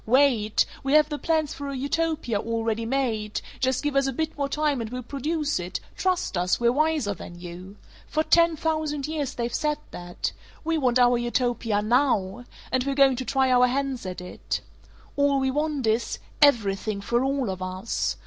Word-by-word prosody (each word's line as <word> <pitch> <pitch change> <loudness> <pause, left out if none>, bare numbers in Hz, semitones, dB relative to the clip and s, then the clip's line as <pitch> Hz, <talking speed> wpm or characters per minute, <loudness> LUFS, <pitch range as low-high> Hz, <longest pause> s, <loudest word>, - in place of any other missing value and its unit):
Wait! 240 -4 +4 0.2
We 270 +1 -1
have 305 0 +6
the 295 -1 -4
plans 315 -3 0
for 285 0 -6
a 275 - -4
Utopia 295 -4 -1
already 225 0 -1
made; 225 -5 -1 0.2
just 260 0 +1
give 295 -1 -1
us 275 0 +3
a - - 0
bit 315 +4 -2
more 280 -1 -2
time 295 -3 0
and 225 - -4
we'll 250 +1 -5
produce 295 - -1
it; 175 +1 -4 0.2
trust 370 - 0
us; 180 +1 +1
we're 235 0 +4
wiser 305 -6 +1
than 175 -1 -10
you.' 180 +3 -9 0.3
For 310 - 0
ten 335 0 +4
thousand 310 -2 -1
years 300 -4 -3
they've 235 0 -2
said 300 -1 0
that. 175 0 -4 0.3
We 330 0 0
want 255 -5 +2
our 245 -1 +4
Utopia 240 -3 0
NOW 240 -2 +1 0.3
and 260 -1 +2
we're 275 0 -1
going 270 -2 +5
to 260 - -3
try 265 +2 +2
our 250 0 +5
hands 265 -1 -1
at 180 0 -5
it. 180 - -4 0.6
All 280 -1 +3
we 265 0 +1
want 295 -2 -1
is 220 +2 0 0.2
everything 215 -7 +3
for 235 +5 0
all 270 -5 0
of 185 0 -6
us! 185 +4 -2
260 Hz, 185 wpm, -25 LUFS, 225-290 Hz, 0.6 s, have